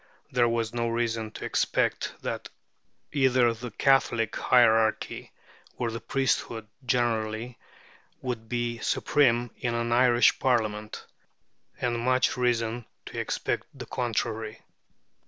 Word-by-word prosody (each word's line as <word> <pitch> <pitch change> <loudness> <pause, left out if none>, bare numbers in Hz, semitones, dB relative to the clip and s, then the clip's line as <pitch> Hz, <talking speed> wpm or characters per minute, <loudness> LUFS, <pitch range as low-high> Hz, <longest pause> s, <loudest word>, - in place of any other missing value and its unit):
There 120 -1 +3
was 115 -1 -1
no 120 -1 0
reason 115 -1 -1
to - - -6
expect - - 0
that - - -4 0.6
either 130 -4 +3
the 120 +2 -7
Catholic 120 -4 +2
hierarchy 110 -3 +3 0.5
or 120 -2 -1
the 115 - -4
priesthood 120 -4 -1 0.2
generally 115 -2 -1 0.6
would 115 -3 -5
be 120 -1 -2
supreme 120 -5 +2
in 120 -3 -2
an 115 0 -1
Irish 120 0 +4
Parliament, 110 -4 0 0.7
and 120 -1 0
much 130 +2 +2
reason 120 -2 0 0.2
to - - -6
expect - - -2
the 130 -2 -7
contrary. 115 -2 -3
120 Hz, 115 wpm, -27 LUFS, 115-125 Hz, 0.7 s, Irish